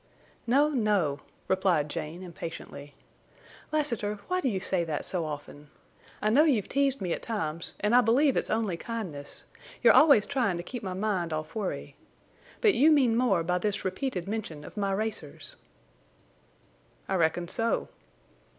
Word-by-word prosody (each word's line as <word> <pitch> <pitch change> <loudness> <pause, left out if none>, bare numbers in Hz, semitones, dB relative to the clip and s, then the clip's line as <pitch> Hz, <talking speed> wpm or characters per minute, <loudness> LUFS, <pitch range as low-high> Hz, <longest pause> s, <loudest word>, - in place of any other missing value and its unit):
"No, 280 +5 +4
no," 205 - +1 0.3
replied 185 -5 +2
Jane, 155 +4 -5
impatiently. 165 -5 -8 0.8
"Lassiter, 235 -9 0
why 365 0 0
do 265 - +1
you 195 -4 -1
say 185 -2 0
that 155 -3 -3
so 175 -3 -1
often? 145 -1 -8 0.5
I 215 - +3
know 285 +7 +6
you've 255 -11 +2
teased 275 -2 +1
me 180 -3 -1
at - - -4
times, 165 -8 -3
and 210 +2 +1
I 250 - +8
believe 260 +5 +3
it's - - -1
only 215 -6 0
kindness. 180 -11 -6 0.4
You're - - +8
always 280 -9 +7
trying 250 -10 0
to 175 - -5
keep 245 +6 -6
my 190 -3 -4
mind 190 -4 -1
off 155 0 -4
worry. 210 -4 -4 0.7
But 430 -4 +5
you 300 +2 +5
mean 260 -7 +4
more 240 -8 +2
by 180 +2 0
this 205 +1 -2
repeated 190 -1 -2
mention 195 -8 -4
of - - -11
my 200 -2 -1
racers?" 220 - -4 1.5
"I - - -2
reckon 170 -1 +1
so." 230 +6 0
205 Hz, 160 wpm, -28 LUFS, 170-245 Hz, 1.5 s, I